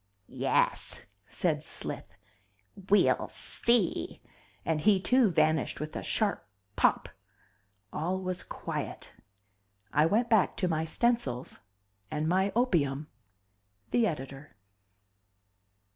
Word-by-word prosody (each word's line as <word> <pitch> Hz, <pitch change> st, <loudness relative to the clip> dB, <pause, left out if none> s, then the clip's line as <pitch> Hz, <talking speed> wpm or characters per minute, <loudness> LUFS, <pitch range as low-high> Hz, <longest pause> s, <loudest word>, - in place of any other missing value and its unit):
"Yes," -, -, 0 dB, 0.2 s
said -, -, 0 dB
Slith, -, -, -6 dB, 0.8 s
"we'll 205 Hz, -, +4 dB
see!" 235 Hz, -7 st, 0 dB, 0.5 s
And 160 Hz, -2 st, 0 dB
he 200 Hz, +2 st, +4 dB
too 250 Hz, +4 st, +4 dB
vanished 155 Hz, -5 st, +1 dB
with 155 Hz, +1 st, -5 dB
a -, -, -3 dB
sharp 215 Hz, -3 st, 0 dB, 0.3 s
pop. -, -, +2 dB, 0.9 s
All 180 Hz, +5 st, -1 dB
was 185 Hz, -1 st, -3 dB
quiet. -, -, -6 dB, 0.8 s
I 150 Hz, +2 st, +4 dB
went 225 Hz, +7 st, +2 dB
back 220 Hz, -2 st, +3 dB
to 185 Hz, -, +1 dB
my 160 Hz, -2 st, 0 dB
stencils 160 Hz, -, -1 dB, 0.5 s
and 155 Hz, 0 st, -2 dB
my 190 Hz, +3 st, +2 dB
opium. 155 Hz, -, +1 dB, 0.8 s
THE 235 Hz, -2 st, +3 dB
EDITOR. 135 Hz, -, -6 dB
180 Hz, 100 wpm, -30 LUFS, 155-215 Hz, 0.9 s, we'll